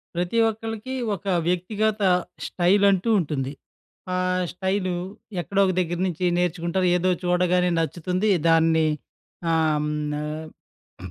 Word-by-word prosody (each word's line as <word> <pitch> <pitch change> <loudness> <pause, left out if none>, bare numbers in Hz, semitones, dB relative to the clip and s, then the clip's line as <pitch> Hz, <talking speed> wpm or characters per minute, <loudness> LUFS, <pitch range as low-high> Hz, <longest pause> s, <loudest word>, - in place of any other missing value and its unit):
ప్రతి 175 +6 -1
ఒక్కళ్ళకి 225 +3 -5 0.2
ఒక 195 - -14 0.2
వ్యక్తిగత 210 +4 0 0.4
స్టైల్ 190 +3 +2
అంటూ 190 +4 0
ఉంటుంది. 140 -5 -2 0.6
ఆహ్, 185 0 0
స్టైలు 190 0 -1 0.5
ఎక్కడో 195 +4 -2
ఒక 185 - +1
దెగ్గర 175 -1 -1
నుంచి 180 0 -2
నేర్చుకుంటారు 180 +1 0
ఏదో 180 +1 +1
చూడగానే 180 0 +2
నచ్చుతుంది. 180 +5 -1 0.2
దాన్ని 160 -1 +4 0.7
ఆహ్, 160 -2 +2
హ్మ్. 150 0 -2 0.9
ఆహ్, 95 - -7
180 Hz, 115 wpm, -24 LUFS, 165-190 Hz, 0.9 s, దాన్ని